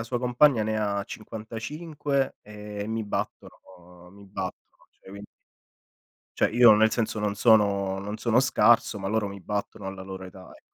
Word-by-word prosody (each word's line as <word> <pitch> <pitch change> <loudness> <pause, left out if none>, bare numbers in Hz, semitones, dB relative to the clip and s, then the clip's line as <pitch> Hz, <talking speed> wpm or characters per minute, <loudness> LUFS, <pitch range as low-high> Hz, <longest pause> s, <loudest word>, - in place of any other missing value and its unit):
la 115 - -4
sua 120 +1 -3
compagna 125 -1 +3
ne 110 0 -1
ha 100 -1 -1
55 135 +7 -4
e 105 -1 -7
mi 110 +1 -2
battono 90 -3 -7
mi 100 - -15
battono, 95 -1 -8
cioè - - -20
quindi 100 +1 -10 1.1
Cioè - - +3
io 120 -1 +7
nel 110 +1 +4
senso, 110 -2 -1
non 105 -1 -1
sono 100 -3 +3
non 105 +2 -5
sono 115 +1 +2
scarso, 120 -4 +3
ma 95 - -4
loro 110 -1 0
mi 100 0 -8
battono, 100 0 -4
alla 95 -1 -7
loro 95 0 -8
età 95 0 -12
ec - - -19
105 Hz, 170 wpm, -26 LUFS, 100-115 Hz, 1.1 s, io